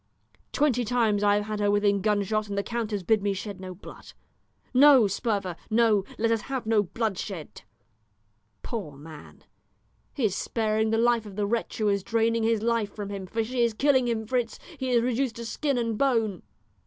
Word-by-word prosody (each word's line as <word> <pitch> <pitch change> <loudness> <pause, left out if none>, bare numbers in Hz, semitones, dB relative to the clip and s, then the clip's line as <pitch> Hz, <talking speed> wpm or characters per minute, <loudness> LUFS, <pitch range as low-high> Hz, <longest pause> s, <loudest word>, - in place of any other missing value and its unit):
Twenty 270 -5 +2
times 225 -3 +1
I 205 0 +4
have 205 - 0
had 215 0 -4
her 205 0 +2
within 205 -1 +2
gunshot, 210 +1 0
and 200 - -4
the 200 - 0
count 235 -1 -3
has 205 -3 -3
bid 215 +3 +2
me 200 0 0
shed 200 0 -6
no 185 -1 -7
blood. 190 - -13 0.6
'No, 265 -2 +7
Sperver, 200 -3 -1
no; 220 -3 +3
let 230 +1 +1
us 225 -2 +1
have 265 -3 -3
no 220 -1 +3
bloodshed.' 195 -4 -4 1.0
Poor 195 -11 -5
man, 150 +1 -13 0.7
he 265 - 0
is 195 -3 0
sparing 220 -1 0
the 225 - +1
life 235 -1 +2
of 200 - -10
the 205 0 0
wretch 230 +3 -2
who 215 - 0
is 200 -1 +2
draining 230 +2 +1
his 225 -1 +1
life 230 -3 0
from 205 -2 -5
him, 195 -2 -6
for 225 +4 -1
she 245 +2 -2
is 235 -2 +2
killing 260 -1 +3
him, 225 -2 -1
Fritz; 240 0 -1 0.2
he 260 -1 -2
is 240 -2 +3
reduced 250 0 0
to 235 - -7
skin 280 +3 -1
and 230 -3 -1
bone." 225 -9 +1
220 Hz, 195 wpm, -26 LUFS, 205-235 Hz, 1.0 s, No